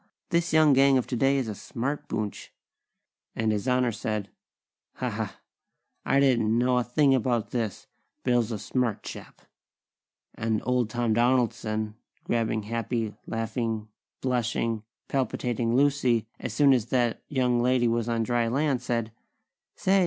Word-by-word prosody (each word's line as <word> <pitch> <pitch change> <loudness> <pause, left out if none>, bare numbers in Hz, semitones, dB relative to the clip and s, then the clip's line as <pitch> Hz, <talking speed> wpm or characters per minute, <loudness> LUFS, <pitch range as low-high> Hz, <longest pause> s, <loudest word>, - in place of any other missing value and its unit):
This 170 0 +1
young 155 -2 +6
gang 135 0 +5
of 125 - 0
today 135 +2 +2
is 130 -4 -1
a 110 - -3
smart 130 +8 -4
boonch!" 105 -2 -4 0.9
and 110 -1 +1
His 105 +3 -2
Honor 125 -1 +2
said: 105 -2 -3 0.6
"Ha, - - -3
ha! - - -4 0.6
I 135 - +3
didn't 115 -5 +3
know 125 +1 +3
a - - 0
thing 135 +3 +3
about 120 -3 0
this! 115 -5 -3 0.4
Bill's 120 -2 +2
a 110 - -2
smart 120 +1 -1
chap!" - - -10 0.9
And 110 -1 -1
Old 125 -3 +1
Tom 120 -1 0
Donaldson, 115 -3 +1 0.3
grabbing 110 -2 0
happy, 115 0 -2
laughing, 115 -1 -2 0.3
blushing, 115 -3 0 0.3
palpitating 120 -3 -1
Lucy 130 -5 +3
as 125 - -4
soon 140 +4 +5
as 120 -3 +1
that 120 -3 +1
young 125 -4 +1
lady 125 0 +3
was 115 0 0
on 115 -1 +1
dry 120 0 +1
land, 135 +1 +1
said: 115 -3 -2 0.6
"Say! 195 +1 +3
120 Hz, 145 wpm, -27 LUFS, 115-130 Hz, 0.9 s, young